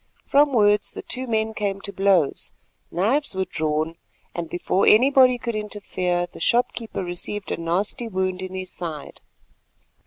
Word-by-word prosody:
From 285 +1 +4
words 210 -3 +3
the - - -7
two 255 0 -3
men 220 -1 0
came 200 -2 -2
to 200 - -6
blows, 190 -6 +1 0.4
knives 225 - 0
were 190 0 0
drawn, 155 -1 -2 0.4
and 170 -2 -4
before 185 +2 0
anybody 255 +2 +6
could 235 0 -4
interfere 190 -4 -2
the 175 - -13
storekeeper 235 -1 0
received 180 +3 -4
a - - -1
nasty 180 +8 -1
wound 185 -2 -2
in 185 0 -6
his 185 -1 -5
side. 160 -4 -7
195 Hz, 150 wpm, -23 LUFS, 175-225 Hz, 0.4 s, anybody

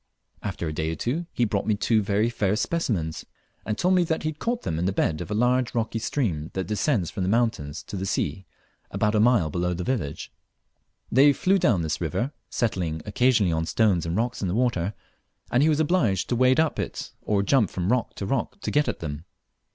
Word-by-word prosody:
After 95 -4 -4
a 75 - -3
day 80 +1 -2
or - - -3
two 155 - -2
he 120 - +1
brought 100 -2 -1
me 110 - +3
two 110 +2 +2
very 105 +2 +1
fair 105 -4 0
specimens, 110 - -1 0.4
and 105 0 -1
told 180 +1 +2
me 180 -1 +4
he - - -5
had 155 -1 -2
caught 240 +1 -2
them 80 - -2
in 90 - 0
the 95 - +1
bed 80 -4 0
of 85 - -6
a 105 - -1
large 125 +2 +1
rocky 115 -1 -1
stream 95 - -1
that 95 -1 -1
descends 105 - 0
from - - -5
the 90 - 0
mountains 100 -9 0
to - - -8
the 95 +1 -3
sea 90 -1 -2 0.4
abort 105 +2 0
a 110 - +3
mile 110 -9 +3
below 90 +1 -1
the 90 - -4
village. 85 - -3 0.8
They 140 +4 +6
flew 190 +6 +2
down 100 - +2
this 80 +1 -2
river, 100 - -1 0.2
settling 85 -9 -1
occasionally 110 -2 +2
on 80 0 -1
stones 100 -7 +2
and 85 +3 -1
rocks 120 +2 -1
in 95 - -1
the 90 - -1
water, 110 -6 0 0.6
and 125 - +3
he 155 - +4
was 150 -1 +2
obliged 145 - +1
to 120 - +1
wade 130 +3 +4
up 160 -1 +1
it - - -4
or 100 -2 +1
jump 115 -2 +3
from 90 +3 -1
rock 125 -2 0
to 100 - -4
rock 130 - -2
to - - -3
get 150 0 +2
at - - -3
them. 75 0 -5
105 Hz, 220 wpm, -25 LUFS, 90-125 Hz, 0.8 s, They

